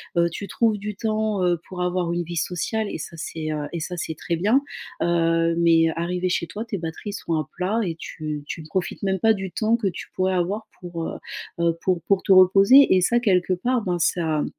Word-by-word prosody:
Heu, 170 0 +3
tu 200 +4 -6
trouves 225 -1 +1
du 210 +1 -5
temps, 215 -2 -1
heu, 175 -2 +2
pour 180 -1 -6
avoir 180 -1 0
une 175 0 -1
vie 170 +1 -6
sociale, 195 +6 -1
et - - -4
ça 165 - -8
c'est, 155 -1 -4
heu, 150 -1 -3
et 170 - -3
ça 180 +2 -4
c'est 160 -1 -4
très 170 +2 -3
bien. 215 +10 +3 0.4
Heu, 165 -1 +2
mais 165 -1 +4
heu, - - -2
arrivé 180 +2 -1
chez 170 -1 -1
toi, 210 +5 -5
tes 230 -3 -4
batteries 165 +4 -5
sont 200 -4 -4
à 155 -2 0
plat 195 +6 0
et 170 -4 -2
tu 155 -2 -5
tu 165 - -5
ne 155 - -11
profites 185 +4 -3
même 190 -1 0
pas 220 +4 +4
du 190 -3 -5
temps 220 +5 +1
que 230 -4 -1
tu 175 - -8
pourrais 185 0 +1
avoir 200 +5 -1
pour, 175 -2 -6
heu, - - -5 0.4
heu, 170 -1 +2
pour 180 -2 0
pour 195 +1 +1
te - - +1
reposer. 195 +7 +7
Et 185 - +4
ça 240 +7 +3
quelque 185 -6 +2
part, 240 +7 0
ben, 180 -2 -1
ça 160 -3 +1
180 Hz, 235 wpm, -23 LUFS, 170-205 Hz, 0.4 s, reposer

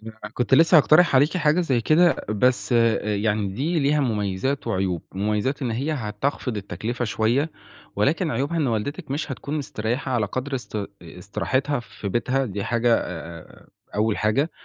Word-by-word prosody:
أنا 110 +1 -9 0.2
كنت 125 +2 +2
لسه 165 +4 +6
هاقترح 155 +2 +5
عليكِ 145 +7 +3
حاجة 160 0 +3
زي 135 -9 +1
كده 165 +8 +4
بس 125 +5 +1
آآ 115 -3 +2
يعني 105 -1 0
دي 145 - -1
ليها 145 +1 +2
مُميزات 110 +2 -1
وعيوب، 95 -6 -1
مُميزات 105 +8 -1
إن 125 - -1
هي 135 +8 -1
هتخفض 120 0 -3
التكلفة 115 +4 -4
شوية، 120 +8 +1 0.5
ولكن 155 - +1
عيوبها 140 +7 -1
إن 155 -4 +1
والدتِك 135 - -3
مش 145 +1 -2
هتكون 140 +3 -5
مسترَيحة 125 -1 -3
على 115 -4 +1
قدر 130 +6 -4
است 120 -4 -4 0.2
استراحتها 125 - -2
في 110 -3 -7
بيتها 130 +6 0
دي 100 -2 -4
حاجة 120 0 +2
آآ 85 -1 -8 0.3
أول 105 0 +1
حاجة، 135 +10 +1
120 Hz, 160 wpm, -23 LUFS, 105-140 Hz, 0.5 s, لسه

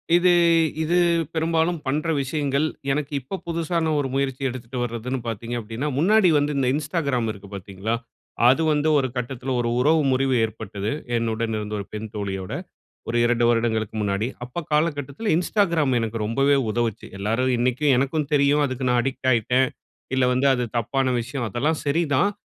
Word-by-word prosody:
இது 180 +1 +5 0.5
இது 165 +3 +1 0.4
பெரும்பாலும் 165 +1 +1
பண்ற 150 +4 -1
விஷயங்கள். 140 +1 0 0.3
எனக்கு 145 +1 -2
இப்ப 185 +10 -6
புதுசான 165 -1 -1
ஒரு 140 - 0
முயற்சி 135 -1 -1
எடுத்துட்டு 125 0 -7
வர்றதுனு 120 +2 -3
பாத்தீங்க 115 +2 -4
அப்டீன்னா, 115 +6 -4
முன்னாடி 195 +5 +4
வந்து 145 0 0
இந்த 135 -2 +1
Instagram 145 -5 -1
இருக்கு 100 -1 -11
பாத்தீங்களா? 100 +3 -3 0.5
அது 135 +5 +4
வந்து 150 +1 +1
1 135 -2 +1
கட்டத்தில 125 +1 -4
1 120 - -1
உறவு 155 +5 +4
முறிவு 130 0 +2
ஏற்பட்டது, 105 -1 -5 0.3
என்னுடன் 115 0 -1
இருந்த 105 0 -5
1 100 - -5
பெண் 110 +1 -5
தோழியோட, 95 -2 -4 0.6
ஒரு 115 - -1
2 120 0 +2
வருடங்களுக்கு 110 -2 0
முன்னாடி. 100 +2 0 0.2
அப்ப 155 +7 -6
காலகட்டத்தில 150 - 0
Instagram 170 -5 +1
எனக்கு 115 0 -3
ரொம்பவே 135 +5 +3
உதவுச்சு. 115 -1 -2
எல்லாரும் 115 +6 0
இன்னைக்கும் 130 +4 +2
எனக்கும் 140 +2 0
தெரியும், 145 +1 +4
அதுக்கு 130 -1 -3
நான் 125 0 +3
அடிக்ட் 130 0 -2
ஆயிட்டேன், 125 +3 +2 0.5
இல்லை 130 -1 +3
வந்து 130 +2 +2
அது 125 -1 -1
தப்பான 130 +3 0
விஷயம், 125 +1 -4
அதெல்லாம் 150 +9 0
சரிதான். 155 +4 +2
130 Hz, 155 wpm, -23 LUFS, 115-150 Hz, 0.6 s, இது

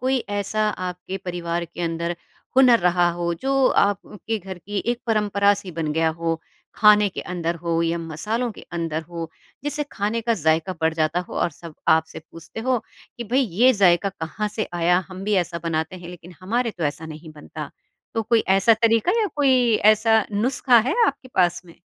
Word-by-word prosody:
कोई 260 +1 +1 0.2
ऐसा 215 +1 0 0.2
आपके 180 +1 -6
परिवार 170 -1 -2
के 170 +1 -10
अंदर 170 +1 -3 0.4
हुनर 250 -3 +7
रहा 175 0 +3
हो, 170 0 -1
जो 270 +7 +1 0.2
आपके 210 +2 -3
घर 190 -2 -8
की 200 +3 -4
एक 240 0 -2
परंपरा-सी 205 -3 +1
बन 155 -2 -1
गया 160 +1 +2
हो? 165 -1 -1 0.4
खाने 210 -1 +6
के - - -6
अंदर 170 -1 -1
हो 170 -1 -2
या 165 +1 0
मसालों 210 +10 -3
के - - -12 0.2
अंदर 165 -1 -2
हो, 165 0 -7 0.3
जिससे 295 0 -2
खाने 215 +3 -1
का 230 0 +1
ज़ायका 160 +1 +1
बढ़ 160 0 +1
जाता 160 +2 0
हो - - -8
और - - +1
सब 165 0 -12 0.2
आपसे 160 0 -4
पूछते 165 +6 -9
हो, 255 +1 +1 0.4
"कि 235 - -4
भई 250 +5 +1
ये 245 +2 +3
ज़ायका 195 -2 +3
कहाँ 195 +3 -4
से 215 - -1
आया 175 +1 +3
हम 185 +1 -8
भी 210 0 +1
ऐसा 170 0 -6
बनाते 160 +2 -2
हैं 175 -1 -10
लेकिन 175 0 -11
हमारे 230 +5 -1
तो 170 -6 -5
ऐसा 160 +2 -10
नहीं 155 +1 -11
बनता।" 150 0 -8 0.4
तो 225 - 0
कोई 225 +1 +3 0.2
ऐसा 220 +4 +5
तरीका 230 - +3
या 425 - +2
कोई 255 -5 +3 0.2
ऐसा 220 0 +2
नुस्खा 250 +3 +3
है 280 - +1
आपके 270 -2 -3
पास 175 -1 +2
में? 170 -2 -16
185 Hz, 190 wpm, -23 LUFS, 170-225 Hz, 0.4 s, हुनर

